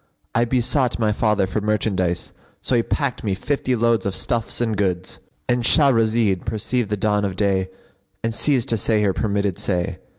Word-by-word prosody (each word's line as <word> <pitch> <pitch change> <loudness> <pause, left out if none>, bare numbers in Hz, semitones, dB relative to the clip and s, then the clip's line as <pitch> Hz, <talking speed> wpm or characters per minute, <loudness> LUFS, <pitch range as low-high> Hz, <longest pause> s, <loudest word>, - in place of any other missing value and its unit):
I 120 +1 +2
besought 125 +1 +1
my 110 -2 +1
father 105 -2 +1
for 100 +3 -3
merchandise; 100 -4 -1 0.3
so 130 - 0
he 120 - +4
packed 140 +2 -2
me 100 -3 0
fifty 130 +4 -1
loads 115 -1 +2
of 100 -3 -2
stuffs 115 -2 -2
and 115 -2 0
goods."—And 95 +5 -3
Shahrazed 115 - +3
perceived 110 +1 -2
the 105 - -1
dawn 105 0 +1
of 95 -2 -2
day 95 -1 +1 0.5
and 115 0 -1
ceased 130 0 +1
to 115 - +2
say 105 0 +1
her 100 -2 +2
permitted 100 -3 -1
say. 90 -3 -2
110 Hz, 170 wpm, -21 LUFS, 100-120 Hz, 0.5 s, he